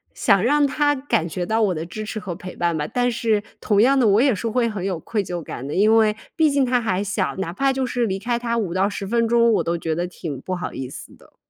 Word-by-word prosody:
想 200 Hz, -3 st, +3 dB
让 290 Hz, +4 st, +3 dB
他 290 Hz, +1 st, +1 dB
感 260 Hz, -, -1 dB
觉 175 Hz, +2 st, -3 dB
到 220 Hz, +4 st, 0 dB
我 195 Hz, -4 st, +2 dB
的 160 Hz, +1 st, -4 dB
支 215 Hz, +6 st, -6 dB
持 215 Hz, 0 st, -5 dB
和 200 Hz, -4 st, -5 dB
陪 180 Hz, +2 st, -9 dB
伴 170 Hz, -1 st, 0 dB
吧。 150 Hz, -1 st, -2 dB
但 245 Hz, 0 st, 0 dB
是 220 Hz, -2 st, 0 dB, 0.2 s
同 205 Hz, -2 st, +2 dB
样 270 Hz, +2 st, +4 dB
的， 235 Hz, -, +4 dB
我 205 Hz, +1 st, +4 dB
也 265 Hz, +1 st, +4 dB
是 215 Hz, +3 st, -3 dB
会 235 Hz, +1 st, +1 dB
很 210 Hz, -5 st, -4 dB
有 185 Hz, -4 st, -2 dB
愧 210 Hz, +1 st, -2 dB
疚 175 Hz, -2 st, -5 dB
感 130 Hz, -2 st, -7 dB
的， 145 Hz, -, -4 dB
因 215 Hz, +3 st, +4 dB
为 215 Hz, -1 st, +3 dB, 0.2 s
毕 320 Hz, -2 st, +4 dB
竟 280 Hz, -1 st, +2 dB
他 250 Hz, -1 st, +1 dB
还 200 Hz, -3 st, -1 dB
小， 190 Hz, -1 st, -2 dB
哪 180 Hz, -3 st, -3 dB
怕 270 Hz, +8 st, +1 dB
就 265 Hz, 0 st, -1 dB
是 245 Hz, -2 st, -1 dB
离 190 Hz, -1 st, -2 dB
开 235 Hz, +4 st, -2 dB
他 235 Hz, -1 st, -1 dB
5 195 Hz, -7 st, -2 dB
到 190 Hz, +2 st, +2 dB
10 200 Hz, -1 st, -5 dB
分 230 Hz, +3 st, +1 dB
钟， 235 Hz, 0 st, +4 dB
我 -, -, +2 dB
都 170 Hz, +1 st, -1 dB
觉 165 Hz, -1 st, -2 dB
得 175 Hz, +3 st, -2 dB
挺 155 Hz, -6 st, -7 dB
不 185 Hz, -, -3 dB
好 180 Hz, -, -5 dB
意 130 Hz, -1 st, -5 dB
思 -, -, -10 dB
的。 -, -, -23 dB
210 Hz, 290 characters per minute, -22 LUFS, 180-235 Hz, 0.2 s, 样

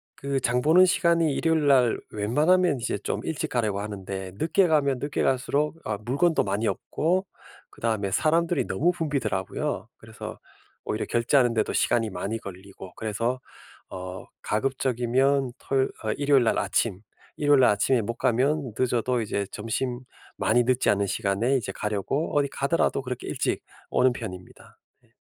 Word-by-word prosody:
그 140 Hz, 0 st, -2 dB
장 125 Hz, 0 st, +1 dB
보는 175 Hz, +6 st, +6 dB
시간이 170 Hz, -4 st, +2 dB
일요일 160 Hz, 0 st, +1 dB
날 125 Hz, -4 st, +4 dB
웬만하면 150 Hz, -, +2 dB
이제 115 Hz, -3 st, -2 dB
좀 -, -, -3 dB
일찍 160 Hz, -3 st, -2 dB
가려고 105 Hz, -5 st, -1 dB
하는데 95 Hz, -2 st, -6 dB
늦게 175 Hz, -, +2 dB
가면 140 Hz, -5 st, +2 dB
늦게 145 Hz, +2 st, -2 dB
갈수록 140 Hz, +4 st, +1 dB
어 110 Hz, -1 st, -2 dB
물건도 155 Hz, +7 st, +2 dB
많이 100 Hz, +3 st, -1 dB
없고 170 Hz, -, 0 dB, 0.5 s
그다음에 110 Hz, -4 st, -2 dB
사람들이 165 Hz, -, +2 dB
너무 175 Hz, +2 st, +2 dB
붐비더라고요. 130 Hz, -, -2 dB
그래서 -, -, -9 dB, 0.5 s
오히려 110 Hz, -, -2 dB
결제하는 120 Hz, +1 st, +2 dB
데도 110 Hz, -2 st, 0 dB
시간이 115 Hz, -2 st, +1 dB
많이 100 Hz, +4 st, -3 dB
걸리고 95 Hz, -1 st, -10 dB
그래서 115 Hz, +4 st, -2 dB, 0.5 s
어 90 Hz, 0 st, -7 dB, 0.2 s
가급적이면 130 Hz, +2 st, +1 dB
토요 135 Hz, -1 st, +1 dB, 0.2 s
어 110 Hz, -, +1 dB
일요일 140 Hz, -3 st, +3 dB
날 -, -, +2 dB
아침, 100 Hz, -5 st, 0 dB, 0.4 s
일요일 145 Hz, -2 st, +4 dB
날 -, -, +6 dB
아침에 115 Hz, +4 st, +2 dB
못 110 Hz, +2 st, -3 dB
가면 130 Hz, +1 st, +1 dB
늦어도 125 Hz, 0 st, +1 dB
이제 100 Hz, -2 st, -2 dB
점심 120 Hz, +3 st, -3 dB, 0.4 s
많이 120 Hz, +2 st, +3 dB
늦지 130 Hz, +1 st, +2 dB
않은 100 Hz, 0 st, +2 dB
시간에 105 Hz, +6 st, 0 dB
이제 100 Hz, -6 st, -4 dB
가려고 105 Hz, -, -2 dB
어디 140 Hz, -1 st, +3 dB
가더라도 140 Hz, 0 st, 0 dB
그렇게 125 Hz, -2 st, -6 dB
일찍 -, -, -1 dB, 0.3 s
오는 130 Hz, 0 st, +3 dB
편입니다. 90 Hz, -7 st, -9 dB, 0.3 s
예. -, -, -33 dB
125 Hz, 345 characters per minute, -26 LUFS, 105-145 Hz, 0.5 s, 보는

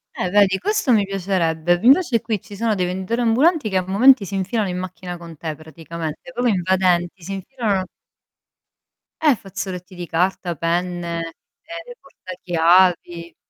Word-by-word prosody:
Eh 180 Hz, -, -2 dB
vedi, 200 Hz, -2 st, +4 dB
questo 410 Hz, -, 0 dB
mi 210 Hz, -4 st, +4 dB
piacerebbe. 175 Hz, -3 st, 0 dB
Invece 260 Hz, -, +4 dB
qui 215 Hz, -5 st, -2 dB
ci 205 Hz, -, -12 dB
sono 225 Hz, +2 st, 0 dB
dei 185 Hz, -2 st, 0 dB
venditori 190 Hz, +6 st, -2 dB
ambulanti 255 Hz, +3 st, +2 dB
che 190 Hz, -, 0 dB
a 185 Hz, -, -1 dB
momenti 230 Hz, +3 st, +5 dB
si 195 Hz, -, -9 dB
infilano 195 Hz, +2 st, -1 dB
in 180 Hz, -, -3 dB
macchina 180 Hz, -1 st, -7 dB
con 170 Hz, -2 st, -11 dB
te 155 Hz, 0 st, -5 dB
praticamente, 160 Hz, +1 st, -8 dB
proprio 245 Hz, 0 st, +1 dB
invadenti, 180 Hz, -1 st, +1 dB
si 195 Hz, +4 st, -5 dB
infilano 195 Hz, -2 st, -2 dB, 1.3 s
Eh, 300 Hz, -4 st, +4 dB
fazzoletti 190 Hz, -2 st, -7 dB
di 175 Hz, 0 st, -6 dB
carta, 175 Hz, +1 st, -1 dB
penne, 170 Hz, 0 st, -2 dB, 0.3 s
ehm, 335 Hz, +8 st, -9 dB
portachiavi. 175 Hz, -, +1 dB
185 Hz, 145 wpm, -21 LUFS, 175-215 Hz, 1.3 s, momenti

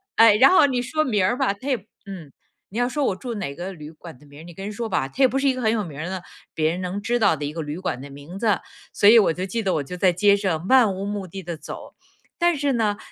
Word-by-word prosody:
哎， 225 Hz, -2 st, +7 dB
然 265 Hz, +4 st, +7 dB
后 370 Hz, -, +6 dB
你 255 Hz, -3 st, 0 dB
说 310 Hz, +5 st, -1 dB
名 210 Hz, -9 st, +1 dB
儿 220 Hz, +7 st, +1 dB
吧， 265 Hz, -7 st, +1 dB
它 230 Hz, +8 st, -11 dB
也 260 Hz, -, +2 dB
不 200 Hz, -, -17 dB, 0.2 s
嗯， 170 Hz, -8 st, -9 dB, 0.4 s
你 210 Hz, -, -8 dB
要 245 Hz, +1 st, +1 dB
说 290 Hz, 0 st, -1 dB
我 190 Hz, -, 0 dB
住 235 Hz, +4 st, -6 dB
哪 160 Hz, -9 st, -4 dB
个 180 Hz, +5 st, -6 dB
旅 155 Hz, -3 st, -10 dB
馆 160 Hz, -3 st, -12 dB
的 150 Hz, -, -20 dB
名 145 Hz, +1 st, -15 dB
儿， -, -, -12 dB
你 175 Hz, -, -11 dB
跟 195 Hz, +4 st, -8 dB
人 210 Hz, -, -5 dB
说 225 Hz, +1 st, -4 dB
吧， 135 Hz, -, 0 dB
他 140 Hz, -, -18 dB
也 260 Hz, -, +7 dB
不 255 Hz, -, -2 dB
是 275 Hz, +1 st, +1 dB
一 265 Hz, -, +3 dB
个 255 Hz, -, -5 dB
很 220 Hz, -2 st, +2 dB
有 220 Hz, -2 st, 0 dB
名 155 Hz, -5 st, -9 dB
儿 170 Hz, +4 st, -4 dB
的， 185 Hz, -2 st, -5 dB, 0.3 s
别 155 Hz, 0 st, +1 dB
人 180 Hz, +2 st, -4 dB
能 185 Hz, +2 st, -3 dB
知 240 Hz, +4 st, -1 dB
道 200 Hz, -7 st, +3 dB
的 145 Hz, 0 st, -5 dB
一 150 Hz, -, -5 dB
个 165 Hz, -, -4 dB
旅 150 Hz, +1 st, -5 dB
馆 180 Hz, -9 st, -4 dB
的 140 Hz, -, -9 dB
名 145 Hz, +7 st, -10 dB
字， 210 Hz, -3 st, +2 dB, 0.3 s
所 200 Hz, -, +3 dB
以 230 Hz, +2 st, +9 dB
我 200 Hz, -, +3 dB
就 180 Hz, +3 st, -4 dB
记 225 Hz, +5 st, -3 dB
得 195 Hz, -4 st, 0 dB
我 150 Hz, -, -1 dB
在 180 Hz, +5 st, +1 dB
街 200 Hz, +3 st, +4 dB
上 185 Hz, -5 st, -2 dB
漫 245 Hz, -2 st, +5 dB
无 195 Hz, +1 st, -5 dB
目 205 Hz, -2 st, -4 dB
的 190 Hz, +3 st, -8 dB
地 170 Hz, -1 st, -5 dB
走， -, -, -10 dB, 0.4 s
但 345 Hz, -2 st, +3 dB
是 280 Hz, -1 st, 0 dB
呢， 215 Hz, -3 st, 0 dB
195 Hz, 330 characters per minute, -23 LUFS, 170-235 Hz, 0.4 s, 以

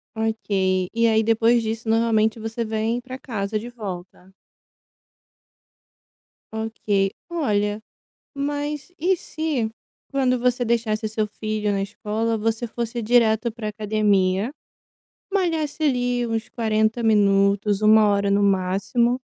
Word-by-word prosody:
Ok. 195 Hz, -4 st, 0 dB
E 230 Hz, 0 st, +3 dB
aí, 220 Hz, 0 st, +3 dB
depois 230 Hz, +1 st, +3 dB
disso, 225 Hz, 0 st, -4 dB
normalmente, 225 Hz, -1 st, +2 dB
você 225 Hz, +1 st, -3 dB
vem 220 Hz, +2 st, -1 dB
pra 255 Hz, +1 st, -8 dB
casa 215 Hz, -4 st, -3 dB
de 235 Hz, +3 st, -7 dB
volta? 190 Hz, -5 st, -8 dB, 2.2 s
Ok. 215 Hz, -3 st, -1 dB, 0.2 s
Olha, 210 Hz, -10 st, 0 dB, 0.5 s
mas, 290 Hz, +1 st, -3 dB
e 365 Hz, +4 st, +2 dB
se 310 Hz, -10 st, -2 dB, 0.4 s
quando 260 Hz, -2 st, +2 dB
você 245 Hz, 0 st, +1 dB
deixasse 225 Hz, -2 st, 0 dB
seu 215 Hz, 0 st, -1 dB
filho 215 Hz, 0 st, -2 dB
na 200 Hz, -1 st, 0 dB
escola, 215 Hz, +2 st, -2 dB
você 225 Hz, +2 st, -1 dB
fosse 235 Hz, +1 st, -4 dB
direto 230 Hz, 0 st, +3 dB
pra 220 Hz, -1 st, -5 dB
academia. 210 Hz, -1 st, +1 dB, 0.8 s
Malhasse, 320 Hz, -6 st, -1 dB
ali, 245 Hz, -3 st, +1 dB
uns 225 Hz, -1 st, -3 dB
40 220 Hz, 0 st, 0 dB
minutos, 200 Hz, -1 st, +3 dB
1 215 Hz, 0 st, +6 dB
hora 200 Hz, 0 st, +1 dB
no 200 Hz, +1 st, +3 dB
máximo, 200 Hz, +5 st, +1 dB
220 Hz, 120 wpm, -23 LUFS, 210-240 Hz, 2.2 s, 1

